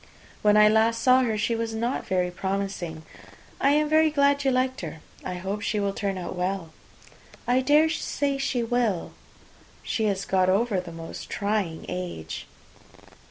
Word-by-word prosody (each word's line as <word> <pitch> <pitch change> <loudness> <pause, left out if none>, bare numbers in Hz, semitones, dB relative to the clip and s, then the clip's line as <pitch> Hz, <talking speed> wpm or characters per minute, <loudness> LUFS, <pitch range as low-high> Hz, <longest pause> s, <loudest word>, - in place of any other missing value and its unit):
When 210 0 +5
I 210 0 +8
last 220 +2 +3
saw 255 +2 +5
her, 225 -4 0
she 220 +3 0
was 225 0 -3
not 235 +3 -2
very 180 -1 0
promising. 190 -4 -3 0.6
I 275 - +3
am 300 +1 +3
very 315 +1 +4
glad 285 -1 +2
you 270 - +3
liked 260 0 0
her. 160 -2 -6 0.2
I 180 - -4
hope 195 +3 -4
she 215 -1 -1
will 200 -1 0
turn 195 -2 -2
out 180 0 -5
well." 180 -2 -3 0.7
"I 245 +1 +3
dare 295 +4 +5
say 285 -3 -1
she 250 -3 0
will; 230 -6 0 0.7
she 220 - -1
has 195 -2 0
got 185 -1 +2
over 200 +1 +2
the 180 -2 -7
most 165 0 -8
trying 200 -6 -2
age." 85 -4 -5
210 Hz, 165 wpm, -26 LUFS, 185-250 Hz, 0.7 s, I